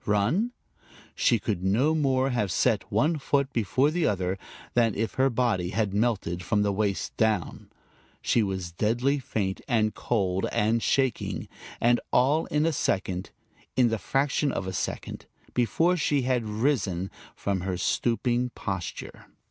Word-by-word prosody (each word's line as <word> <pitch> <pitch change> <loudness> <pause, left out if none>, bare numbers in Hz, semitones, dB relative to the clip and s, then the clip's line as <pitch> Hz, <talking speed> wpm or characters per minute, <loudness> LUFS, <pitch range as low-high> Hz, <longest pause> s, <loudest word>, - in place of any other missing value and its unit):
Run? 115 - +2 0.6
She 120 - +3
could 100 -4 -3
no 120 +11 +3
more 135 -3 +2
have 105 -6 0
set - - +1
one 155 +1 +2
foot 140 0 0
before 130 +6 +2
the 170 -1 +1
other, 95 -1 -1 0.3
than 115 -3 +3
if 115 +1 -1
her 135 +1 +3
body 115 -8 0
had 100 0 -1
melted 100 -6 0
from 105 +3 +1
the 100 - +1
waist 100 -1 -1
down. 110 -5 0 0.5
She 115 - +2
was 95 -4 -2
deadly 120 +10 +1
faint 100 -7 -2
and 110 -3 +2
cold 95 -5 0
and 110 +2 +2
shaking, 130 -1 0 0.3
and 120 +1 +3
all 140 +6 +3
in 150 +1 +1
a 165 - +2
second, 95 -7 -1 0.5
in 125 -2 +4
the 115 -1 -1
fraction 140 +3 +1
of 95 - -3
a 95 - -4
second, - - -4 0.3
before 160 - +2
she 145 -4 +1
had 125 -2 0
risen 105 -6 0 0.2
from 100 -2 -2
her 95 -1 -2
stooping 120 +4 0
posture. 95 -4 -5
115 Hz, 150 wpm, -27 LUFS, 95-130 Hz, 0.6 s, in